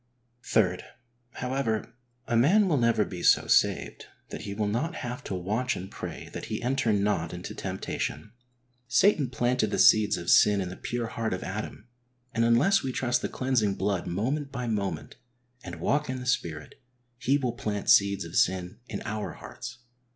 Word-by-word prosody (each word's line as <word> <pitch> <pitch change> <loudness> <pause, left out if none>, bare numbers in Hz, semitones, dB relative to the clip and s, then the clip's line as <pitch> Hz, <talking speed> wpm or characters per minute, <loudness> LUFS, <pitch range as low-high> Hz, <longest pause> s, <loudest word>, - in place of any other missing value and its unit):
(3.) - - +2 0.5
However, 125 -4 -2 0.3
a 120 - -1
man 185 - +5
will 160 -5 +2
never 115 -3 +3
be 90 -2 -7
so - - +5
saved - - +1 0.2
that - - -6
he 100 - -5
will 105 0 0
not 150 +11 -1
have 125 0 -5
to 95 - -3
watch 105 +8 -1
and 95 +2 -7
pray - - -7
that - - -5
he - - -3
enter 130 -2 +1
not 100 -5 0
into 90 - -7
temptation. 110 - -4 0.6
Satan 145 - +3
planted 120 -2 +1
the - - -2
seeds 110 -1 +5
of 85 0 -1
sin 105 -1 +6
in 95 -2 -2
the 90 - -7
pure 120 +3 -3
heart 115 -3 -2
of 90 - -7
Adam, 105 +3 -6 0.5
and 115 - +1
unless 125 +13 +4
we 135 - -3
trust 125 -1 0
the - - -2
cleansing 120 -7 0
blood 95 -2 -1
moment 135 - -2
by 125 -2 -4
moment, 95 -10 -3 0.5
and 85 -1 -7
walk 145 - 0
in 130 0 -3
the 125 - -7
Spirit, 80 -11 -2 0.4
he 135 +2 +2
will 125 -4 -2
plant 105 -4 -4
seeds 100 -2 +4
of 85 +1 -9
sin 90 +1 +1
in - - -5
our 105 0 -4
hearts. 120 -1 -9
115 Hz, 180 wpm, -27 LUFS, 100-125 Hz, 0.6 s, sin